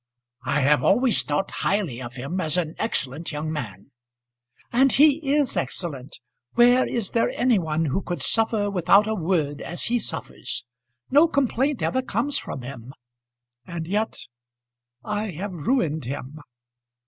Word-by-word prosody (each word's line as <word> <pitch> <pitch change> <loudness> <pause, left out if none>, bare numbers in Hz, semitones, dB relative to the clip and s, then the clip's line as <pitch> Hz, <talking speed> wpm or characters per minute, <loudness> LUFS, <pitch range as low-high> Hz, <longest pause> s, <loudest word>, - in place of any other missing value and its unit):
"I 140 +3 +1
have 145 +2 +4
always 245 +3 +3
thought 150 +6 -2
highly 175 - -1
of 120 0 -8
him 140 +9 -3
as 160 +1 -1
an 165 -3 -1
excellent 160 - 0
young 155 +1 -3
man." 115 -5 -7 0.8
"And 265 +2 +5
he 290 +1 +6 0.2
is 290 -4 +2
excellent. 140 -7 -3 0.4
Where 245 +2 +5
is 230 -5 -2
there 230 - +2
any 245 -4 +2
one 160 -1 -1
who 155 +6 -1
could 175 -1 -4
suffer 220 -2 +1
without 195 +2 +4
a 220 - -1
word 160 -6 -1
as 175 - -6
he 240 +1 +1
suffers? 165 - -3 0.5
No 295 +5 +6
complaint 280 -2 0
ever 260 - +1
comes 255 +4 -1
from 130 - -7
him; 130 0 -9 0.7
and 170 -2 -5
yet 210 +4 -1 0.9
I 210 +1 -2
have 190 +5 -5
ruined 160 - 0
him." 140 +3 -6
180 Hz, 150 wpm, -24 LUFS, 145-230 Hz, 0.9 s, he